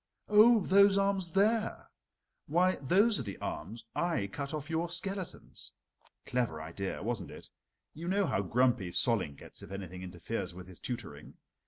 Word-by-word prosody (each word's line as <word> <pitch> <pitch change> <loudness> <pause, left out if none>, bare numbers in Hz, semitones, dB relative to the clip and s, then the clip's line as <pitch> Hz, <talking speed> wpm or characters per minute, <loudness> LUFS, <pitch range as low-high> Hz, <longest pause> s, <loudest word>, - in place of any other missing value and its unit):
Oh, 215 +2 +7
those 200 +1 +5
arms 195 -3 +1
there? 215 +3 +1 0.6
Why, 180 +5 +3
those 200 - +3
are - - -1
the 100 -5 -6
arms 110 +6 -6
I 170 - 0
cut 140 +8 -5
off 155 -2 -4
your 165 +1 -1
skeletons. 185 +2 -4 0.5
Clever 120 -11 -1
idea, 85 +4 -5
wasn't 110 -5 -2
it? - - -11 0.4
You 165 +3 -7
know 195 +2 +2
how 100 - 0
grumpy 115 -1 +2
Solling 95 - +1
gets - - -12
if - - -10
anything 95 -2 -7
interferes 90 -1 -5
with 90 0 -9
his 90 -2 -10
tutoring. 95 - -6
140 Hz, 155 wpm, -32 LUFS, -, 0.6 s, Oh